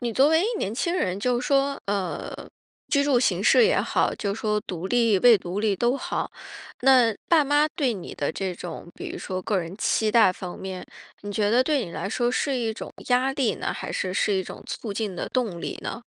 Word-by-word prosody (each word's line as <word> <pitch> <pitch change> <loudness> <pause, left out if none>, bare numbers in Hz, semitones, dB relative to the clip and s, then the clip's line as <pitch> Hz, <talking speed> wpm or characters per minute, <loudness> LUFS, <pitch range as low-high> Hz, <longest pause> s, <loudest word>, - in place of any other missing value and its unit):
你 240 -2 -2
作 270 +6 +4
为 320 +2 +4 0.2
年 200 - -2
轻 340 +8 -1
人， 185 - -1
就 245 +2 +1
是 250 - -4
说， 275 0 +1
呃， 200 -2 -3 0.5
居 280 -1 +2
住 270 -4 +3
形 - - +1
式 475 - +6
也 475 - +3
好， - - +1
就 200 -1 -2
说 210 -1 -1
独 180 0 -5
立 230 -4 +3
未 240 -3 +7
独 180 +2 -4
立 210 -2 +1
都 240 +6 +1
好， - - -3 0.5
那 250 -4 +5
爸 320 -3 +5
妈 290 +2 +3
对 275 -5 0
你 185 -4 -8
的 145 - -2
这 190 +1 -3
种， 170 0 -8
比 - - -6
如 - - -6
说 185 -1 -4
个 200 +2 0
人 170 +1 -5
期 220 0 +1
待 215 -4 +5
方 180 -1 -8
面， 190 -1 -6 0.4
你 205 - -7
觉 205 0 +1
得 245 +3 +4
对 285 -2 +1
你 175 - -9
来 185 - -4
说 240 +3 0
是 270 +2 0
一 230 -3 -1
种 - - -8 0.2
压 255 +2 +3
力 270 -4 0
呢， - - -3
还 - - -6
是 185 - -2
是 205 +2 +1
一 190 - +1
种 - - -9
促 220 - -5
进 205 -2 -3
的 175 - -4
动 220 -10 -2
力 - - -5
呢？ 235 - -5
225 Hz, 245 characters per minute, -25 LUFS, 190-260 Hz, 0.5 s, 未